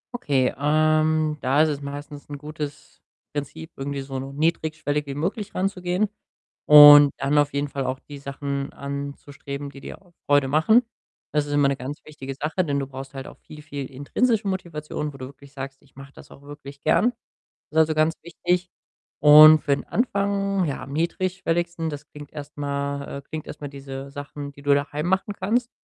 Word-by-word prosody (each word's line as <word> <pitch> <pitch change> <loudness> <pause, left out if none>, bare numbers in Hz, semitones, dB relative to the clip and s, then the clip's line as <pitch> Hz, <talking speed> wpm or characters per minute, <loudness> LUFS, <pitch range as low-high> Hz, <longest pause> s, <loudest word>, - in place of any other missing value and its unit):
Okay, 140 - +1
ähm, 155 +1 +2
da 135 +4 +3
ist 160 - +2
es 145 -1 -3
meistens 145 +1 -8
'n 145 - -6
gutes 150 -1 -8 0.3
Prinzip, 155 +2 -6
irgendwie 140 0 -4
so 135 -1 -5
niedrigschwellig 150 +1 -1
wie 140 - -5
möglich 195 +7 -3
ranzugehen 185 +1 0 0.6
und 145 -1 +10
dann 140 +2 0
auf 145 0 +2
jeden 140 +1 -1
Fall 135 -1 -4
auch 130 +1 -3
die 145 -1 -11
Sachen 140 0 -4
anzustreben, 140 0 -6
die 140 - -13
dir - - -9
auch 175 -2 -25
Freude 145 -1 +4
machen. 190 - +4 0.5
Das 150 -1 +1
ist 145 - -5
immer 145 -1 +4
'ne 140 - 0
ganz 135 +4 -6
wichtige 135 -3 -8
Sache, 160 +6 -1
denn 140 -1 0
du 135 - -2
brauchst 135 +1 -9
halt 135 - -6
auch - - -12
viel, 150 -1 -13
viel 140 -3 -6
intrinsische 205 - 0
Motivation, 155 -5 -4
wo - - -11
du 130 - -7
wirklich 140 0 -16
sagst: 135 -1 -7
„Ich 140 -2 -27
mache 135 +1 -12
das - - -15
auch 140 - -15
wirklich 145 -1 -11
gern.“ 235 +10 +3 0.6
Ist, 155 - -10
also, 160 0 +4
ganz 155 +1 +2
wichtig. 175 +2 -2 0.5
Und 155 +1 +9
für 140 - +2
den - - -7
Anfang, 200 -2 0
ja, 140 - -4
am 135 - -9
niedrigschwelligsten 170 0 -1
das 145 0 -8
klingt 145 -1 -12
erst 150 -1 -9
mal 140 -1 -3
äh, - - -22
klingt 155 +2 -7
erst - - -9
mal 145 - -5
diese 135 0 -8
Sachen, 145 0 -7
die 140 - -15
du 145 0 +4
daheim 145 +2 -2
machen 190 +3 0
kannst. 240 +5 -1
145 Hz, 190 wpm, -24 LUFS, 140-160 Hz, 0.6 s, und